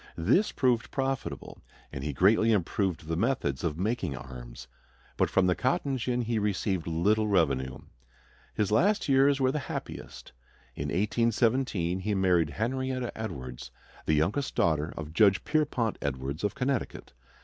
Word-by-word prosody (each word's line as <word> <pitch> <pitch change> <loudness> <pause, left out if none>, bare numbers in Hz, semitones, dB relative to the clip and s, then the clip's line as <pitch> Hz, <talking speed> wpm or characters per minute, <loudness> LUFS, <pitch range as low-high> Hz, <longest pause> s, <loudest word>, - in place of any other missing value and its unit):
This 120 - +3
proved 125 -3 +1
profitable, 135 -1 -3 0.3
and 65 - -5
he 75 - -2
greatly 105 +10 +4
improved 95 -3 0
the 80 +1 -2
methods 90 - 0
of 80 -3 -1
making 95 - -1
arms. - - -10 0.5
But - - +1
from 95 - +3
the 90 - +3
cotton 135 - 0
gin 125 0 -1
he 115 -1 0
received 100 -4 -1
little 105 +7 +2
revenue. 70 -9 +1 0.8
His 105 -2 0
last 200 - +3
years 135 0 +4
were 130 -1 +3
the 150 - -1
happiest. - - -7 0.4
In 70 - -3
1817 105 - +1
he 105 +2 -1
married 90 -5 +3
Henrietta 130 - -2
Edwards, 65 - -6 0.4
the 80 - +3
youngest 100 - 0
daughter 80 0 +1
of 80 0 -6
Judge 100 +1 +4
Pierpont 140 -7 0
Edwards 70 +4 -3
of 105 - -1
Connecticut. 130 -1 -2
100 Hz, 145 wpm, -28 LUFS, 80-125 Hz, 0.8 s, greatly